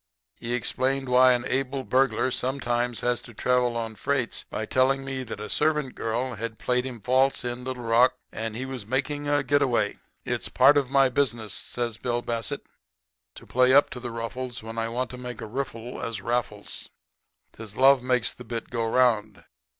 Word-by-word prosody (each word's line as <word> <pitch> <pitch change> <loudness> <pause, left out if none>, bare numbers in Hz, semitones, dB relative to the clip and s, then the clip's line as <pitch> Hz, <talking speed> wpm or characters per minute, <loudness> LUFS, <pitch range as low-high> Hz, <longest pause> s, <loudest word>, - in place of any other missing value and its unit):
He 120 +1 -2
explained 135 +2 0
why 125 0 +6
an 120 0 -1
able 135 +1 -1
burglar 130 0 +2
sometimes 120 -3 -1
had 120 0 +1
to 120 - -12
travel 125 0 +1
on 115 -1 -3
freights 130 +3 -1
by 110 - -3
telling 135 +3 +2
me 135 -1 -3
that 115 -4 -6
a 105 - -5
servant 150 -3 +1
girl 120 +3 -2
had 110 0 -5
played 125 +1 0
him 125 -3 -7
false 130 +3 +2
in 120 0 -4
Little 130 -1 -5
Rock, 120 +2 +4 0.2
and 110 0 -4
he 130 +3 -3
was 130 -4 -6
making 140 +6 -2
a 145 - +1
quick 145 -1 +2
get 145 0 +4
away. 120 -6 +1 0.3
"'It's - - -2
part 145 - +6
of 140 -3 +2
my 135 0 +5
business,' 120 -6 -1
says 120 -3 -3
Bill 120 -1 -1
Bassett, 115 -3 -3 0.7
'to - - -12
play 130 +1 +4
up 145 - +5
to 125 - -6
the 120 0 -5
ruffles 115 +1 -5
when 115 +1 -5
I 115 0 -1
want 125 +2 -2
to 125 - -8
make 125 -2 -7
a - - -5
riffle 120 0 -5
as 115 -3 -3
Raffles. 110 -2 -3 0.6
'Tis 110 -2 -10
loves 135 0 +6
that 125 - -10
makes 125 -3 +2
the 125 - -11
bit 115 -1 -5
go 115 -1 -1
'round. 110 -7 +2
125 Hz, 195 wpm, -26 LUFS, 115-130 Hz, 0.7 s, why